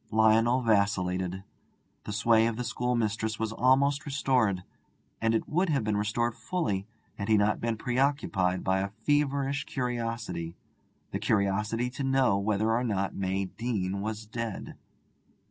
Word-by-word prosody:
Lionel 110 +3 +4
vacillated. 95 -4 +1 0.6
The - - -4
sway 110 +1 +4
of 115 - -1
the 125 - -2
schoolmistress 115 -2 -1
was 110 -1 -2
almost 135 +5 +3
restored, 125 -9 +1 0.6
and 115 0 +2
it - - -1
would 180 +4 +1
have 140 -6 +1
been 105 -1 0
restored 105 +3 0
fully 105 - -2 0.3
had 100 - -3
he 110 -1 +5
not 105 +1 +2
been 115 -1 -1
preoccupied 120 -8 0
by 95 0 +2
a 100 +1 -1
feverish 140 +4 0
curiosity 115 -9 -3 0.5
the - - -2
curiosity 110 +3 0
to 135 +2 -5
know 135 -6 +3
whether 105 +2 +1
or 120 +2 +1
not 100 -5 -1
May 95 0 -1
Deane 100 -2 -3
was 110 +1 -4
dead. 115 -1 -5
110 Hz, 145 wpm, -29 LUFS, 100-125 Hz, 0.6 s, he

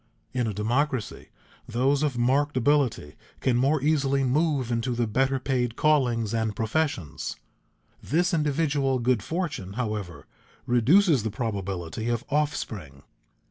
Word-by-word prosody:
In 125 -3 0
a 110 - -2
democracy, 120 +3 -1 0.4
those 130 +4 +1
of 145 -5 0
marked 135 +4 +1
ability 125 - +1 0.3
can 130 - +1
more 135 +5 +2
easily 140 -3 +2
move 135 -2 +1
into 120 +1 -1
the 120 0 +1
better 135 +5 +1
paid 125 -3 -1
callings 120 -8 +2
and 110 -2 -1
professions. 110 - -2 0.7
This 175 +5 +1
individual 145 -3 +1
good 120 -2 +1
fortune, 160 - -4
however, 105 -6 -4 0.4
reduces 135 - +4
the 110 - -2
probability 100 -2 -3
of 120 -1 -1
offspring. 105 - -2
125 Hz, 125 wpm, -26 LUFS, 110-145 Hz, 0.7 s, reduces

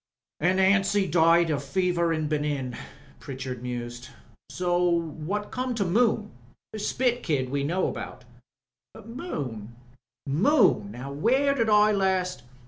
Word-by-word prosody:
"An' 180 +4 +2
Anstey 195 +1 +3
died 165 0 +4
jo* 150 -3 0
fever 170 +3 0
in 155 -2 -1
Benin," 145 -4 -2 0.4
Pritchard 130 -2 -6
mused. 120 0 -6 0.5
"What 175 +1 -1
come 255 -1 -2
to 205 -3 0
Moon? 215 +2 +1 0.4
Spit 245 +3 0
Kid 135 -5 -1
we 140 0 -1
know 175 +6 0
about." 125 - -7 0.8
"Moon 135 - -6 0.3
— 120 +3 -67
Moon! 175 - +3
Now 125 +5 -7
where 260 - +2
did 230 -5 0
I 210 0 +5
last 190 -7 0
170 Hz, 125 wpm, -26 LUFS, 140-205 Hz, 0.8 s, I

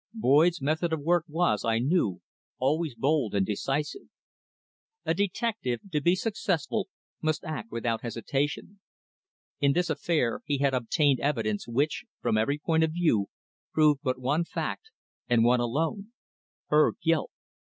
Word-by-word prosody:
Boyd's 165 - +3
method 160 +4 0
of 160 - -1
work 170 +2 +2
was, 155 - +1
I 115 -1 +1
knew, 125 - +1 0.4
always 150 +1 0
bold 130 -3 +1
and 100 -1 +2
decisive. 135 - -2 1.0
A - - +2
detective, 200 - -1
to 150 -2 0
be 175 +5 +4
successful, 195 -1 -1 0.3
must 155 -1 0
act 130 -9 -5
without 115 -1 -1
hesitation. 140 - -3 0.8
In 140 -1 +3
this 175 +1 +1
affair 150 -7 0
he 145 - 0
had 140 -1 +1
obtained 130 +3 +2
evidence 115 -8 -1
which, 140 - 0
from - - 0
every 110 +7 +1
point 160 +1 +1
of 160 -1 0
view, 155 - +2 0.5
proved 150 -3 +4
but 130 -3 -1
one 145 +6 +1
fact, 445 - -4 0.4
and 120 -2 +4
one 120 +1 +4
alone 160 - -2 0.6
her 150 0 +4
guilt. 165 -2 +2
150 Hz, 140 wpm, -28 LUFS, 120-165 Hz, 1.0 s, be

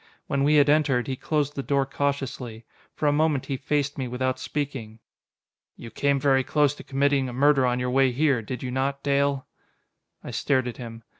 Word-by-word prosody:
When 140 0 0
we 150 +2 +4
had 145 -1 +5
entered, 145 -4 +3
he 135 - -3
closed 145 +1 -1
the 140 - -2
door 140 0 +1
cautiously. 135 -5 -3 0.3
For - - -3
a - - +4
moment 150 -3 +1
he 140 - -2
faced 145 +1 -1
me 130 - -2
without 130 +1 -2
speaking. 135 -7 -4 0.8
"You 115 - -10
came 140 -1 +1
very 135 -1 +3
close 145 +1 +2
to - - -11
committing 140 -1 +1
a - - -7
murder 135 0 +3
on 125 0 0
your 125 0 -1
way 135 0 +3
here, 135 -1 +2
did 125 +4 -6
you 125 - -3
not, 135 +2 -2
Dale?" 140 -1 +1 0.8
I - - -7
stared 130 -3 0
at 120 - -6
him. 115 -2 -9
135 Hz, 200 wpm, -25 LUFS, 125-145 Hz, 0.8 s, had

